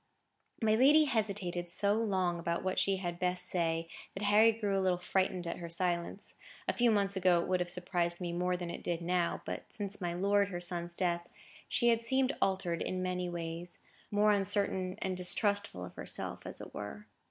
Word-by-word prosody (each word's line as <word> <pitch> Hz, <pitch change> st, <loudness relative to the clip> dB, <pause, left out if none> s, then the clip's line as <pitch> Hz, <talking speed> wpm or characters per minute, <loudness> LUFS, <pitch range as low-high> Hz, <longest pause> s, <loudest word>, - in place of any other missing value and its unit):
My 215 Hz, -1 st, +4 dB
lady 280 Hz, +7 st, +6 dB
hesitated 200 Hz, -8 st, -1 dB
so 200 Hz, +3 st, +2 dB
long 190 Hz, -6 st, 0 dB
about 170 Hz, 0 st, -2 dB
what 185 Hz, 0 st, 0 dB
she 195 Hz, -1 st, +2 dB
had 175 Hz, -2 st, -4 dB
best 180 Hz, 0 st, +1 dB
say, 165 Hz, -2 st, 0 dB, 0.3 s
that 195 Hz, -, -4 dB
Harry 210 Hz, +2 st, +6 dB
grew 210 Hz, -3 st, -1 dB
a 195 Hz, -, +2 dB
little 185 Hz, -1 st, +2 dB
frightened 185 Hz, 0 st, 0 dB
at 170 Hz, -, -3 dB
her 170 Hz, -1 st, -7 dB
silence. 175 Hz, +2 st, 0 dB, 0.3 s
A -, -, +1 dB
few 240 Hz, -1 st, +3 dB
months 200 Hz, -2 st, +2 dB
ago 180 Hz, -2 st, +4 dB
it 170 Hz, -, -2 dB
would 185 Hz, -1 st, +1 dB
have 175 Hz, 0 st, -1 dB
surprised 175 Hz, -1 st, 0 dB
me 175 Hz, -2 st, -3 dB
more 180 Hz, +1 st, 0 dB
than 175 Hz, -1 st, -5 dB
it -, -, -7 dB
did 170 Hz, -1 st, -1 dB
now; 175 Hz, 0 st, 0 dB
but -, -, -6 dB
since 205 Hz, -1 st, -5 dB
my 175 Hz, -1 st, -2 dB
lord 200 Hz, +2 st, +3 dB
her 180 Hz, -2 st, -5 dB
son's 175 Hz, -1 st, -4 dB
death, 175 Hz, -1 st, -1 dB, 0.4 s
she 240 Hz, -, +2 dB
had 230 Hz, -1 st, +3 dB
seemed 265 Hz, +3 st, +1 dB
altered 185 Hz, -3 st, 0 dB
in 185 Hz, 0 st, -2 dB
many 180 Hz, -1 st, -2 dB
ways,—more 175 Hz, +5 st, -2 dB
uncertain 200 Hz, -2 st, 0 dB
and 190 Hz, -1 st, -1 dB
distrustful 185 Hz, -, +1 dB
of 90 Hz, -, -11 dB
herself, -, -, -5 dB
as -, -, -3 dB
it -, -, -10 dB
were. 105 Hz, -, -7 dB
185 Hz, 195 wpm, -33 LUFS, 175-205 Hz, 0.4 s, lady